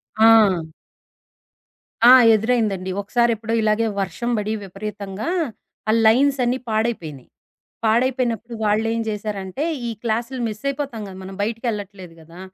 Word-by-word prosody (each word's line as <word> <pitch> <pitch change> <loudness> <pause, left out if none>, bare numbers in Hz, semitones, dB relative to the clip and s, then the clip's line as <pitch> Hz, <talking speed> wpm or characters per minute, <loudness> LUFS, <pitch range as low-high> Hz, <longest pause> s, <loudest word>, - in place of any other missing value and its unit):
ఆ! 220 -5 +5 1.4
ఆ! 245 - +10 0.2
ఎదురైందండి. 215 -4 0
ఒకసారి 235 +3 +1
ఎప్పుడో 225 +1 -4
ఇలాగే 215 +1 +2 0.2
వర్షం 215 +5 -3
పడి 210 +1 -2
విపరీతంగా 200 - -6 0.6
ఆ - - +5
లైన్సన్నీ 255 +1 +3
పాడైపోయినాయి. 215 - -2 0.6
పాడైపోయినప్పుడు 235 0 0
వాళ్ళేం 225 +2 +1
జేసారంటే, 205 +2 -4 0.2
ఈ - - -2
క్లాసులు 235 +3 -2
మిస్ 215 +3 -7
అయిపోతాం 275 -5 -3
గదా. 185 - -10
మనం 190 0 -8
బయటికెళ్ళట్లేదు 205 -5 -4
గదా! 165 +3 -15
220 Hz, 110 wpm, -21 LUFS, 200-235 Hz, 1.4 s, ఆ